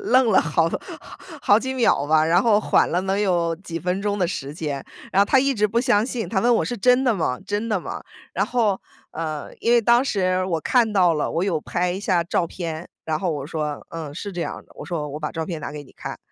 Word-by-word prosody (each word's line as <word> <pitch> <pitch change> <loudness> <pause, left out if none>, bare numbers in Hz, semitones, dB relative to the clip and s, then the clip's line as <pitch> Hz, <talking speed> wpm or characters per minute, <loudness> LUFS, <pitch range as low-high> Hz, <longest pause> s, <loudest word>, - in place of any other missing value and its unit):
愣 255 0 +4
了 205 - +5
好 165 +1 +1 0.8
好 205 - +5
几 260 +3 -3
秒 230 - +2
吧， 155 0 +4
然 165 +2 +3
后 220 -3 +4
缓 - - +3
了 180 +2 +1
能 195 +1 0
有 175 -4 +1
几 170 -2 -6
分 180 +2 -1
钟 205 0 -1
的 180 - +2
时 145 -5 -5
间， 145 -4 -4 0.3
然 195 - +4
后 200 - +5
她 265 - +4
一 275 +1 +3
直 210 -4 +2
不 230 - +1
相 235 -4 +3
信， 245 -4 -3
她 200 -4 0
问 240 +2 +4
我： - - +2
“是 245 - -3
真 250 +4 +3
的 245 -3 +3
吗？ 155 -9 -1
真 210 +3 -2
的 210 - +1
吗？” - - -6 0.3
然 - - 0
后， 220 -6 +1 0.3
呃， 155 -2 -5
因 235 - +3
为 240 - +6
当 235 +3 +5
时 185 -7 0
我 170 -3 0
看 230 - +2
到 185 -5 +4
了， 150 - -1
我 170 +3 0
有 175 -6 0
拍 180 +2 -1
一 190 - -4
下 180 -4 +1
照 170 0 0
片， 165 -1 -6 0.2
然 155 -1 -1
后 185 - 0
我 145 -3 -4
说： 150 -2 -4
“嗯， 155 -3 -6
是 200 +5 -6
这 175 - -4
样 - - -3
的。” - - -22
我 - - -7
说： 150 -4 -3
“我 150 - -5
把 150 - -3
照 165 -1 -3
片 165 -2 -5
拿 - - -5
给 150 -1 -7
你 135 - -19
看。” - - -7
185 Hz, 270 characters per minute, -23 LUFS, 160-215 Hz, 0.8 s, 为